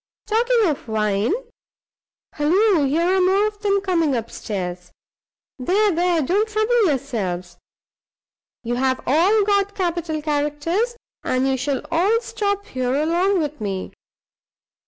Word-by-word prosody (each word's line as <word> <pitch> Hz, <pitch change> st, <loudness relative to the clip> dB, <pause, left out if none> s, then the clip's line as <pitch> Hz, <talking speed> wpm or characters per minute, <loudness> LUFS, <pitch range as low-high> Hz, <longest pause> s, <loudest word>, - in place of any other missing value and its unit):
Talking 465 Hz, +2 st, +2 dB
of 300 Hz, -8 st, -2 dB
wine 215 Hz, -, 0 dB, 1.0 s
halloo! 345 Hz, +2 st, +3 dB
here 310 Hz, +5 st, +1 dB
are -, -, +3 dB
more 385 Hz, +3 st, +3 dB
of 425 Hz, -1 st, -4 dB
them 400 Hz, -1 st, +1 dB
coming 335 Hz, -7 st, +1 dB
up 230 Hz, -1 st, -4 dB
stairs. 180 Hz, -4 st, -5 dB, 0.7 s
There! 395 Hz, +10 st, +2 dB
there! 345 Hz, -1 st, +1 dB
don't 405 Hz, +10 st, +1 dB
trouble 435 Hz, +1 st, +2 dB
yourselves. 205 Hz, -, -3 dB, 1.0 s
You've 240 Hz, +1 st, -2 dB, 0.3 s
all 365 Hz, -, +3 dB
got 400 Hz, 0 st, +1 dB
capital 340 Hz, -4 st, -2 dB
characters, 300 Hz, +10 st, -1 dB, 0.3 s
and 255 Hz, +1 st, 0 dB
you 265 Hz, -, +1 dB
shall 265 Hz, +1 st, -2 dB
all 385 Hz, +8 st, +3 dB
stop 405 Hz, -3 st, -2 dB
here 255 Hz, -4 st, -2 dB
along 345 Hz, +5 st, +1 dB
with 300 Hz, -4 st, -4 dB
me. 195 Hz, -3 st, -3 dB
330 Hz, 125 wpm, -21 LUFS, 260-405 Hz, 1.0 s, halloo